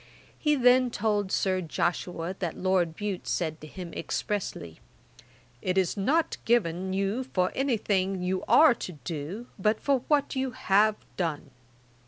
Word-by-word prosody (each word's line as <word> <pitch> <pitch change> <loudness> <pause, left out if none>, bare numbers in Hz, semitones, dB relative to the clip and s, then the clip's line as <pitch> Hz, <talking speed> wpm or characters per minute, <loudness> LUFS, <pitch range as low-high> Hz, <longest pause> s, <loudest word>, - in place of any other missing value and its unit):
He 300 -1 +2
then 250 -1 +5
told 210 -3 0
Sir 185 -1 +1
Joshua 175 +1 -2
that 175 -4 -3
Lord 180 -3 +1
Bute 205 -2 -4
said 160 -2 -2
to 155 - -9
him 175 +1 -8
expressly, 180 - -4 0.8
'It 185 0 -1
is 185 -2 +2
not 295 +11 +1
given 190 -5 +1
you 195 +6 0
for 185 -8 0
anything 200 -8 0
you 185 +1 -1
are 270 +5 +7
to 185 - -7
do, 165 - -6
but 215 +3 +2
for 275 -2 +2
what 290 -2 +2
you 260 -1 -1
have 215 -4 +3 0.2
done.' 155 -6 -2
195 Hz, 145 wpm, -28 LUFS, 180-240 Hz, 0.8 s, are